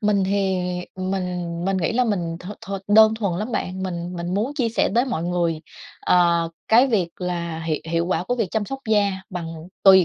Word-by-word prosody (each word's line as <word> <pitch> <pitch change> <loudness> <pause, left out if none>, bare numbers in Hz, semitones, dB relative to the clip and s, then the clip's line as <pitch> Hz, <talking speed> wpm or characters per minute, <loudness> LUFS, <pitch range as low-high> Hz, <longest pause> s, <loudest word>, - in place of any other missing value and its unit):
mình 205 -2 +2
thì, 195 -1 +1 0.4
ừm, 185 0 -3
mình 190 -1 -1 0.4
mình 195 0 +1
nghĩ 175 -3 0
là 250 +2 +2
mình 175 -7 -1
thuần 195 +4 -9
thuần 195 0 -5
đơn 220 +1 +7
thuần 200 -6 -1
lắm 215 +4 -3
bạn, 185 -3 -2
mình 175 -1 -4
mình 175 +1 -3
muốn 220 +8 0
chia 255 -6 +1
sẻ 230 - +1
tới 240 +2 +4
mọi 240 -11 -2
người, 170 -2 0 0.4
ờ, 170 -2 +3 0.2
cái 240 +4 +6
việc 205 -9 +1
là 170 -2 -3
hiệu 155 -2 0
hiệu 170 0 +1
quả 180 0 0
của 245 - 0
việc 225 -6 -1
chăm 220 -2 0
sóc 270 +6 -5
da 205 -2 +3 0.2
bằng 180 -3 -4 0.4
tùy 190 -2 +8
190 Hz, 215 wpm, -23 LUFS, 175-215 Hz, 0.4 s, tùy